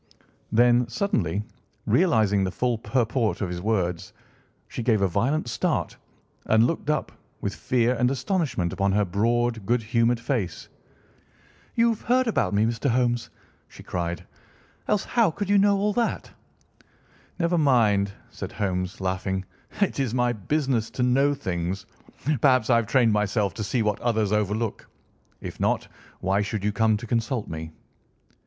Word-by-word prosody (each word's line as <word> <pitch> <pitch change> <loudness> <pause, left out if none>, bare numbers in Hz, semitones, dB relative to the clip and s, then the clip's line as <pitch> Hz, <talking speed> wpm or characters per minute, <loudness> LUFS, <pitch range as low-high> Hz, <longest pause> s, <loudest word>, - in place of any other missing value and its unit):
Then, 120 +1 +4
suddenly 105 - -1 0.4
realising 110 - +3
the 95 - 0
full 120 +5 0
purport 115 -2 0
of 95 - -1
his 90 0 -4
words, 95 -2 -1 0.5
she - - -5
gave 115 -2 +2
a - - +4
violent 120 - 0
start 115 - -1 0.5
and 110 +1 +4
looked 150 +2 -2
up, 150 -1 0 0.3
with - - -3
fear 125 -1 +1
and 125 0 +2
astonishment 135 - -1
upon 100 0 +1
her 105 0 +2
broad, 115 +4 0
good 115 +3 +1
humoured 115 +2 +2
face. 120 -7 -3 1.1
"You've 230 -1 +2
heard 255 +2 +2
about 225 - +1
me, 105 +1 +2
Mr. 115 +4 -1
Holmes," 120 -1 +1 0.4
she - - -14
cried, 85 -1 -3 0.6
"else 205 - +1
how 230 -5 +2
could 200 +4 -3
you 205 - +5
know 200 0 +4
all 205 +1 +1
that?" 235 0 -1 1.1
"Never 170 0 +1
mind," 110 -9 +3 0.2
said - - -7
Holmes, 95 0 -2
laughing; 95 0 -2 0.4
"it 200 - +1
is 130 -3 -1
my 125 -1 +2
business 125 +1 -1
to 125 - +1
know 135 +3 +3
things. 95 -5 -3 0.6
Perhaps 130 -4 +4
I 115 - +6
have 115 -2 0
trained 120 -4 +3
myself 105 0 0
to 110 - -4
see 115 +3 0
what 105 -1 0
others 110 -4 +1
overlook. 105 +1 -1 0.5
If - - -7
not, - - 0 0.3
why 95 +2 +1
should 105 0 -3
you 105 - +1
come 110 0 +2
to 110 - -8
consult 115 0 -1
me?" 80 0 -6
115 Hz, 155 wpm, -25 LUFS, 100-130 Hz, 1.1 s, I